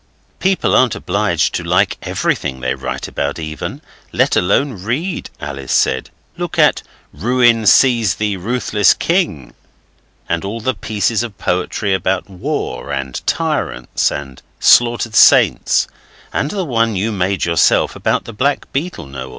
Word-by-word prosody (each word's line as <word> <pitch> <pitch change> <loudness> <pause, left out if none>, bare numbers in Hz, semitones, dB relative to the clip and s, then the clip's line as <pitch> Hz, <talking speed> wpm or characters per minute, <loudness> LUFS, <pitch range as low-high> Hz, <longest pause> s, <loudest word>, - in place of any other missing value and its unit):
'People 190 0 +1
aren't 130 -3 +3
obliged 100 -2 0
to - - -2
like - - +2
everything 65 -1 -2
they 65 0 -1
write - - -5
about 70 0 -3
even, 80 -1 -6 0.3
let - - +2
alone 100 +3 +1
read,' 150 - -3
Alice 70 -2 -6
said. - - +1 0.3
'Look - - -4
at - - +4 0.3
"Ruin 120 -2 +2
seize 115 -6 +4
thee, 105 +1 -1
ruthless 105 0 +2
king!" 165 - -1 0.7
and 85 - -1
all 105 +4 -4
the 130 +4 -1
pieces 105 +2 -1
of 115 -4 -6
poetry 90 +2 -1
about 95 +1 -1
war, 90 -6 -4
and 70 -2 -4
tyrants, - - -1
and 70 -2 -7 0.2
slaughtered 120 -1 +4
saints - - +5 0.5
and 145 - -1
the 195 -1 -3
one 115 -5 0
you 105 +4 -1
made 95 -2 -1
yourself 85 -1 +2
about - - -1
the 115 - -8
black 140 +7 -1
beetle, 150 - -3
Noel. 65 -1 -8
105 Hz, 140 wpm, -17 LUFS, 85-120 Hz, 0.7 s, saints